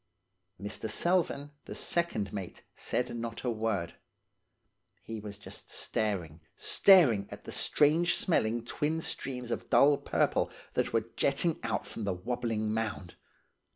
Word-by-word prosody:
"Mr. 105 +2 -5
Selvern, 170 -5 0
the - - -7
second 165 - -1
mate, 95 -3 -6
said 120 -1 -2
not 115 -1 -5
a 125 - 0
word; 110 -6 -1 1.1
he 115 -1 -6
was 105 -1 -7
just 105 - -11
staring, 90 -8 -2
staring 140 - +5
at - - -9
the - - -8
strange 155 +4 +3
smelling 115 -8 +1
twin 150 +6 -1
streams 125 -6 -3
of - - -3
dull 145 +1 +6
purple 140 - +1 0.2
that - - 0
were 115 0 -1
jetting 150 +4 +2
out 115 -1 -2
from 115 - -6
the 100 -2 0
wobbling 110 +1 -2
mound. 110 -5 -3
115 Hz, 135 wpm, -31 LUFS, 105-140 Hz, 1.1 s, dull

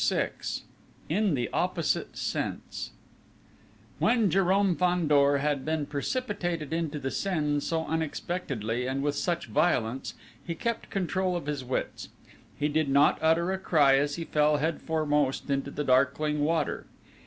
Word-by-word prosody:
VI - - 0 0.8
IN 195 0 +2
THE 120 -2 -1
OPPOSITE 180 +1 -1
SENSE - - -3 1.1
When 225 -7 +3
Jérôme 195 0 +3
Fandor 150 -6 +3
had 145 -1 0
been 155 -1 -1
precipitated 175 - -2
into 160 -2 -1
the 135 -2 -3
Seine 150 -7 0
so 160 +2 -2
unexpectedly 145 - -2
and 135 +1 -2
with 145 0 +1
such 170 +2 -1
violence 115 +3 0 0.3
he 170 - -4
kept 235 +6 -3
control 185 -1 -1
of 175 - -3
his 145 -2 -3
wits: 125 +1 -3 0.5
he 145 - +1
did 150 -1 0
not 140 +2 +4
utter 165 +3 +3
a 190 - -2
cry 150 -7 +4
as 145 0 0
he 165 - -5
fell 150 -1 +3
head 160 +3 -1
foremost 150 -4 0
into 140 0 0
the 150 +1 -3
darkling 140 +3 +2
river. 155 +1 0
150 Hz, 140 wpm, -28 LUFS, 140-175 Hz, 1.1 s, not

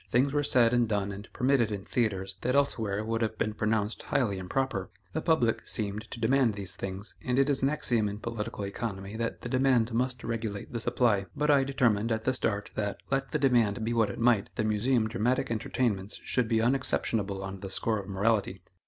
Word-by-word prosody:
Things 135 +3 +2
were 145 - +2
said 125 -4 +4
and 120 -2 +2
done 100 -2 0
and 100 +2 -9
permitted 125 -4 +2
in 100 -1 -4
theatres 95 -5 -1
that 125 +2 0
elsewhere 110 -7 +1
would 115 +1 -1
have 110 -1 -1
been 110 - -1
pronounced 110 0 -1
highly 100 -7 0
improper. 95 0 -2 0.2
The - - -1
public 125 -9 +1
seemed 105 +1 -2
to - - -7
demand 120 -1 +3
these 95 -2 -5
things, 95 +2 -6
and 125 0 0
it 135 +1 +4
is 140 - +1
an 135 - +3
axiom 120 -8 +1
in 100 - -5
political 115 -1 -4
economy, 100 -1 -5
that 115 0 -3
the 120 - -5
demand 130 -3 +2
must 125 +1 0
regulate 110 -3 -4
the 120 - -2
supply. 105 -4 +1
But 150 0 +2
I 140 -2 +5
determined, 120 -5 +1
at 110 0 -1
the 130 - +1
start, 105 -5 -2
that, 100 -1 -2
let 135 0 0
the 150 - 0
demand 120 -6 +2
be 115 - 0
what 115 -3 +2
it 100 - -6
might, 115 -4 +3
the - - 0
Museum 110 +2 +2
dramatic 120 +2 0
entertainments 110 -3 -1
should 125 -3 0
be 110 -1 +2
unexceptionable 110 -6 0
on 95 0 -6
the 95 - -6
score 110 +3 +1
of 100 0 -8
morality. 100 -2 0
115 Hz, 205 wpm, -29 LUFS, 100-125 Hz, 0.2 s, I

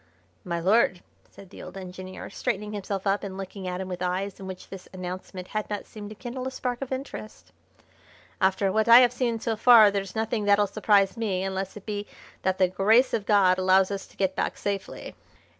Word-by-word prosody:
"My 170 -4 -3
lord," 185 0 +2 0.3
said 195 -2 -15
the - - -11
old - - -9
engineer, 185 0 -8
straightening 210 -2 -3
himself 200 -1 -4
up 200 +1 +1
and 190 -1 -6
looking 195 0 -7
at 180 0 -3
him 190 - -4
with 180 -1 -6
eyes 185 +2 -2
in 190 - -8
which 185 -1 -9
this 190 -2 -10
announcement 185 0 -7
had 215 0 -3
not 205 -1 -4
seemed 210 -1 -9
to 215 - -9
kindle 255 +3 -6
a - - -1
spark 250 -1 -4
of 270 - -5
interest, 260 -5 -7 0.9
"after 190 +1 +2
what 220 +2 +1
I 235 +2 +10
have 245 -1 +4
seen 240 -2 -1
so 225 0 -1
far 220 -2 +7
there's 195 -1 -4
nothing 220 -1 -1
that'll 205 0 +4
surprise 205 0 +2
me 195 -5 -1
unless 190 +1 -4
it 200 - -12
be 205 -1 -4 0.3
that 190 0 0
the 185 - +4
grace 215 +8 +3
of 205 - -1
God 190 -3 +4
allows 190 +1 +4
us 195 -1 -5
to - - -23
get 190 -1 0
back - - -2
safely." 200 -1 -4
200 Hz, 210 wpm, -26 LUFS, 190-215 Hz, 0.9 s, I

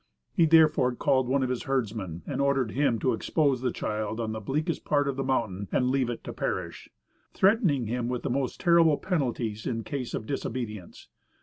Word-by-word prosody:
He 170 -4 +4
therefore 155 -6 +5
called 130 -1 +2
one 135 +1 +1
of 130 - -1
his 125 - -3
herdsmen, 110 -10 -2
and - - -2
ordered 135 -5 +1
him 135 -3 +1
to 125 +2 +1
expose 135 +2 +1
the 125 -1 0
child 110 +1 -3
on 110 -1 -2
the 110 - -4
bleakest 155 - -2
part 145 -1 +1
of 140 - -1
the 135 - -2
mountain 100 -7 -1
and 125 0 +2
leave 130 -2 +1
it 120 - -5
to - - -6
perish, - - -4 0.5
threatening 190 - +3
him 120 +2 -2
with 125 -1 -3
the - - -2
most 130 0 -2
terrible 170 -4 +5
penalties 120 - -2
in 115 -2 -2
case 130 -2 -4
of 110 - -4
disobedience. 110 -7 -5
130 Hz, 195 wpm, -27 LUFS, 115-140 Hz, 0.5 s, therefore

